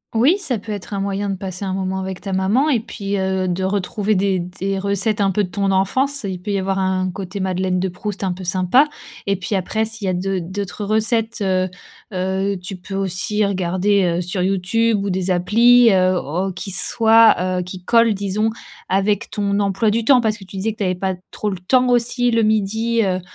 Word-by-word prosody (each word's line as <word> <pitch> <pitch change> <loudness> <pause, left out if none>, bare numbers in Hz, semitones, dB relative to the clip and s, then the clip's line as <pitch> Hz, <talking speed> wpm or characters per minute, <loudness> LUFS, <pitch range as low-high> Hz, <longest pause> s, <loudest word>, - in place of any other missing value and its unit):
Oui 270 - +4
ça 275 - -2
peut 215 +1 -8
être 205 0 -5
un - - -2
moyen 200 +1 -2
de 195 - -1
passer 185 +1 -5
un 190 - -2
moment 190 0 -2
avec 190 -1 -5
ta 195 -2 -5
maman 200 +10 +2
et 270 -6 +2
puis, 205 -3 -5
heu, 190 0 0
de 180 +1 -1
retrouver 200 +2 0
des 190 0 +1
des 190 +2 -3
recettes 200 +2 0
un 195 - +3
peu 205 +2 +1
de 180 - -4
ton 200 -1 0
enfance, 260 +9 +1
il 185 -2 -5
peut 205 - -6
y 200 - +1
avoir 195 0 -1
un 185 -1 0
côté 190 +1 -6
madeleine 185 -1 0
de 190 +1 -1
Proust 200 +2 -6
un 185 -2 0
peu 185 +1 -9
sympa 185 - +3 0.4
et 200 - +2
puis 190 +2 -5
après 215 +4 -1
s'il 220 -1 -7
y - - +2
a - - 0
d'au 190 +1 -1
d'autres 195 +4 -5
recettes, 220 +2 0
heu, 185 -1 +1 0.4
heu, 190 +1 -1
tu 180 +2 -7
peux 185 +2 -8
aussi 195 +2 0
regarder, 190 +1 +1
heu, - - 0
sur 180 +1 -3
YouTube 195 +5 +1
ou 200 - -1
des 185 0 -1
applis 230 +6 +5
heu, 185 0 +3
au 180 +5 -2
qui 195 +2 -6
soient, 225 +3 +5 0.2
heu, - - 0
qui 180 0 -8
collent 230 +1 +4
disons 200 +2 0 0.4
avec 200 +3 +1
ton 200 -1 -1
emploi 200 +2 +1
du 225 +1 -1
temps 260 -1 +6
parce 220 -1 -1
que - - -11
tu 190 +1 -12
disais 215 +3 -1
que - - -20
t'avais 185 -3 0
pas 190 +1 -1 0.2
trop 210 - -3
le 190 - -5
temps 250 +8 +2
aussi 245 0 +2
le 230 0 +2
12:00, 220 +2 +1
heu, 185 -2 0
heu, - - -7
195 Hz, 225 wpm, -20 LUFS, 185-215 Hz, 0.4 s, temps